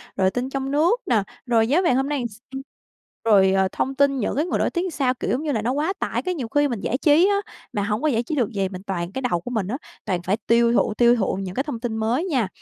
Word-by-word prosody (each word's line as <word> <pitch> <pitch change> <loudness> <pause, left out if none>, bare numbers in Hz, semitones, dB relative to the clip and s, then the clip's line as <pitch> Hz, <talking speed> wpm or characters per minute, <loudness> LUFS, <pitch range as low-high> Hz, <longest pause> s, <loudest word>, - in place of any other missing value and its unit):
rồi 190 -1 +3
tin 250 +2 -3
trong 270 0 -3
nước 340 +11 +2
nè, 220 -5 +2 0.2
rồi 225 -2 +3
giá 310 +8 +3
vàng 300 -9 +2
hôm 270 +2 0
nay 290 -2 -1
làm 240 - -2
s 210 0 -16 0.9
rồi, 195 -3 +5
ờ, 190 0 +3
thông 270 +1 -2
tin 275 0 +3
những 215 - -1
cái 300 +4 +1
người - - -1
nổi - - +2
tiếng 355 0 -2
sao. 265 -3 +1
Kiểu, - - -3
giống 270 +5 -1
như 300 - -1
là, 220 -4 0
nó 240 +3 0
quá 305 +7 0
tải, - - -1
cái 365 -1 -2
nhiều 255 -7 -4
khi 290 0 +4
mình 235 -6 -3
giải 255 - -1
trí 315 +6 +4
á, 405 - +3 0.4
mà 205 - -1
hổng 210 +2 -1
có 310 - +1
giải 235 -4 +1
trí 300 - -3
được 245 -5 +1
gì, 195 -3 -1
mình 185 -1 -8
toàn 175 -1 -3
cái 265 - -4
đầu 170 -1 0
của 245 - -7
mình 210 -6 -1
á, 250 +6 -2 0.3
toàn 180 -4 -1
phải 195 +4 0
tiêu 235 0 +4
thụ, 215 - +2
tiêu 240 +1 +4
thụ 205 -5 0
những 185 -1 -6
cái 270 - 0
thông 285 -7 -5
tin 225 -2 -3
mới 235 +10 0
nha. 260 - 0
245 Hz, 295 wpm, -23 LUFS, 210-285 Hz, 0.9 s, rồi